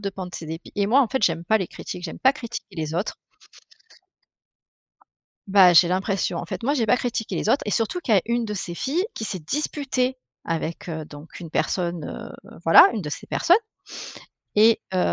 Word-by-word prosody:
de 200 -1 -3 0.2
ses 160 - -6
dépits. 160 +2 -7
Et 200 -1 +1
moi, 250 +7 +5
en 245 - -1
fait, 265 -2 -2
j'aime 165 0 0
pas 220 +5 +3
les 190 - -2
critiques, 180 +1 -8
j'aime 160 - -6
pas 265 - +5
critiquer 235 -8 -8
les 155 -1 -3
autres 180 +5 -2 2.3
Bah, 190 -2 +7
j'ai 170 +1 +7
l'impression, 185 -1 -1
en - - -4
fait. 230 - -6
Moi 285 +4 +2
j'ai 230 -5 +1
pas 250 - +4
critiqué 240 -2 -3
les - - -2
autres 270 - +3
et - - -1
surtout 225 +12 0
qu'il 235 -10 +1
y - - +6
a - - +1
une 235 0 0
de 210 - -4
ces 175 -3 -5
filles 300 - -1
qui - - -6
s'est 195 - -4
disputée 260 - -2 0.3
avec, 165 +1 -3
heu, 160 -2 -4
donc 145 +1 -12
une 170 -3 -9
personne, 175 -1 -1
heu, - - -9
voilà - - +9
une 220 - -3
de 155 - -5
ces - - -6
personnes 350 +2 +4 1.0
et 220 +2 +6
heu, 185 - 0
200 Hz, 205 wpm, -24 LUFS, 170-240 Hz, 2.3 s, voilà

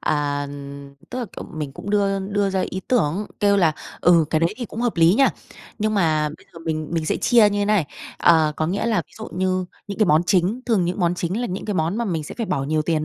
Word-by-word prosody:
à, 145 -1 0 0.6
tức 255 - -4
là, 245 - -2
kiểu, - - -6
mình 150 -3 -4
cũng 200 - -7
đưa 200 -1 +2
đưa 200 +1 -1
ra 190 -1 0
ý 190 - -4
tưởng, 205 -4 +1
kêu 200 -1 +4
là, 165 -5 +4 0.3
ừ, 170 -2 +5
cái 155 - +2
đấy 165 +5 +1
thì 245 - -4
cũng 225 - -7
hợp 240 -4 0
lý 165 +2 +5
nha. 270 +4 +5 0.5
Nhưng 215 +1 0
mà 155 -6 +2
bây - - -22
giờ - - -11
mình 155 -2 -3
mình 160 -2 -1
sẽ - - +1
chia 230 -4 +5
như 205 - -1
thế - - +2
này, 205 -7 +2 0.3
ờ, 160 -3 +4
có 155 - 0
nghĩa 200 +6 -1
là 225 -2 +1
ví - - -29
dụ 220 - -6
như 185 0 0 0.2
những 200 +1 -6
cái 215 - +4
món 155 +1 +4
chính 190 +6 +2
thường 215 -7 +2
những 180 +3 -2
món 175 0 +2
chính 180 +5 -2
là 245 - -1
những 185 -2 -5
cái 210 - -2
món 165 +3 0
mà 235 - -1
mình 165 -6 -2
sẽ - - -8
phải 230 - -1
bỏ 135 - -1
nhiều 155 +2 0
tiền 155 -1 0
185 Hz, 265 wpm, -22 LUFS, 160-205 Hz, 0.6 s, ừ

